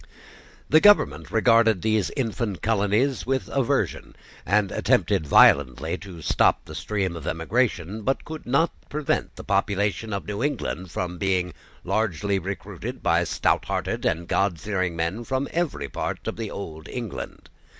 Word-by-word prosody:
The 155 - +6
government 205 0 +4
regarded 115 -3 +4
these 110 -3 +1
infant 115 -6 -2
colonies 115 +5 +1
with 135 0 0
aversion, 135 -4 0 0.3
and 100 +1 +2
attempted 80 - +1
violently 70 +4 +5
to 90 -5 -10
stop - - +2
the 80 - -10
stream 95 +1 -2
of 80 -2 -7
emigration, 95 +2 -1
but 135 +6 -1
could 155 -4 -8
not 160 +7 +2 0.2
prevent 150 -1 -1
the - - -9
population 105 +2 0
of 100 0 -3
New 105 +1 -4
England 120 - -2
from 90 +1 -4
being 90 -3 0 0.3
largely 100 -2 0
recruited 95 -1 -6
by - - +3
stouthearted - - 0
and 85 +2 0
Godfearing 95 -1 0
men 85 +8 -2
from 130 +3 -1
every 170 -2 -1
part - - -4
of - - -2
the 115 -2 -4
old 80 -5 -7
England. 120 -5 -6
100 Hz, 140 wpm, -25 LUFS, 90-115 Hz, 0.3 s, The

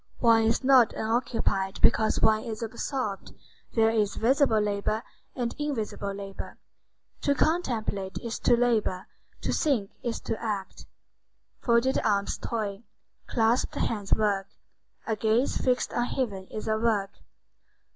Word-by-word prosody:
One 225 -2 +4
is 225 +3 +1
not 255 -4 +6
unoccupied 220 -4 -1
because 220 -1 +3
one 215 0 +4
is 225 -1 -5
absorbed. 230 -2 -4 0.4
There 225 -1 +4
is 215 -3 +1
visible 255 -1 +3
labor 210 +2 -1 0.3
and 240 -2 -2
invisible 225 -8 -3
labor. 195 0 -7 0.6
To 285 - +2
contemplate 225 - -1
is 235 -1 -4
to 240 - +4
labor, 225 -6 +1 0.4
to - - -1
think 250 - +1
is 240 -3 -3
to 225 - -4
act. 205 -4 -4 0.7
Folded 240 +2 +2
arms 200 -2 0
toil, 210 -3 -3 0.5
clasped 230 +1 +1
hands 205 -4 -2
work. 200 -3 +2 0.6
A 220 - 0
gaze 220 +4 +1
fixed 255 -1 0
on 240 - +1
heaven 205 -8 -3
is 215 - -6
a 220 0 +1
work. 215 -4 +1
225 Hz, 130 wpm, -27 LUFS, 205-240 Hz, 0.7 s, not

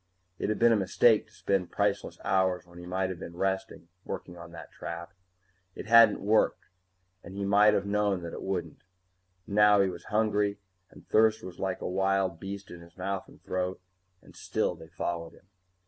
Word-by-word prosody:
It - - -1
had 110 - 0
been 120 0 +5
a - - +5
mistake 105 +3 +3
to - - -26
spend 95 -4 -1
priceless 100 -1 -1
hours 95 -2 +1
when 85 0 -14
he 90 - -9
might 95 +1 -1
have 90 - -7
been 85 - -8
resting 95 -3 -2 0.2
working 90 - -6
on 85 0 -11
that 85 - -11
trap. 85 +2 -7 0.6
It - - -7
hadn't 115 -1 +6
worked, 105 +2 +2 0.6
and 95 - -10
he 100 0 -3
might 105 +2 +5
have 100 - 0
known 100 -3 0
that 85 - -6
it - - -6
wouldn't. 90 -5 -4 0.6
And - - -8
now 105 -1 +6
he 100 -1 +3
was 85 -1 -9
hungry, 105 -1 +1 0.3
and - - -17
thirst 110 0 +3
was 90 - -9
like 95 -1 -2
a - - -3
wild 95 -2 0
beast 100 +1 -7
in 85 - -10
his 85 +1 -17
mouth 95 0 -3
and - - -18
throat, 90 0 -2 0.4
and - - -17
still - - -1
they 80 - -13
followed 85 -1 -4
him. - - -22
95 Hz, 195 wpm, -29 LUFS, 90-105 Hz, 0.6 s, hadn't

